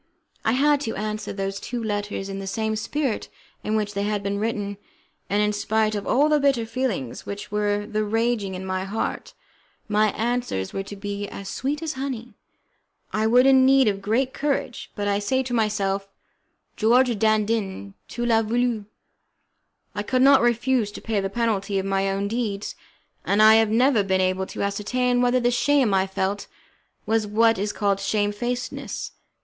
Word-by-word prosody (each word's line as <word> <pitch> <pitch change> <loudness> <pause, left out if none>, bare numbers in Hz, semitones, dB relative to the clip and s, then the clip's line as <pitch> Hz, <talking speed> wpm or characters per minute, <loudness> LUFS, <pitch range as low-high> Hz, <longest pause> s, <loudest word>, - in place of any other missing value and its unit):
I 225 - +2
had 290 +2 +3
to 225 -6 -3
answer 215 +1 -3
those 195 0 -3
two 240 -1 -5
letters 205 -2 -3
in 195 0 -5
the 195 - -6
same 220 +2 -1
spirit 260 +2 -2 0.3
in 215 - -1
which 210 -1 -1
they 200 - -2
had 205 0 -1
been 200 +1 -2
written, 205 -2 -2 0.5
and 205 +1 +2
in 210 0 +1
spite 215 +1 +1
of 205 -1 -4
all 285 +4 +4
the 300 -1 +3
bitter 275 -5 +2
feelings 225 - -3
which 200 0 -6
were 205 0 0
then 215 -1 -2
raging 225 -3 0
in 185 +1 -6
my 185 0 -2
heart, 200 +4 -4 0.5
my 215 0 +3
answers 235 - -2
were 195 - -2
to 200 +1 -8
be 205 0 -4
as 195 -1 -8
sweet 290 +8 -2
as 315 -1 -2
honey. 255 -3 -5 0.8
I 215 0 +1
was 250 +3 +5
in 265 -1 +6
need 265 -1 +5
of 200 -1 0
great 250 +6 0
courage, 280 -4 -2
but 205 -1 -2
I 200 0 +1
said 260 +6 0
to 245 - -4
myself: 200 -3 0 0.7
"George 240 0 +3
Dandin, 215 - 0
tu 240 - -4
las 225 -1 +3
voulu!" 235 -1 0 1.1
I 205 - -2
could 255 +5 +1
not 275 0 +7
refuse 240 -2 +1
to - - -7
pay 220 -3 -1
the 195 0 -2
penalty 205 -2 -1
of 190 - -1
my 195 0 0
own 195 +1 -1
deeds, 210 -2 -3 0.5
and 200 - +1
I 215 0 +8
have 225 -1 +3
never 240 +1 +4
been 190 -1 +1
able 185 0 0
to - - -4
ascertain 245 +5 0
whether 250 +1 +3
the 245 0 +2
shame 260 -3 +2
I 190 0 +2
felt 190 +1 -2 0.6
was 220 -1 +1
what 225 +1 +3
is 205 +1 -1
called 200 -2 0
shamefacedness. 210 +5 -2
215 Hz, 180 wpm, -24 LUFS, 200-245 Hz, 1.1 s, I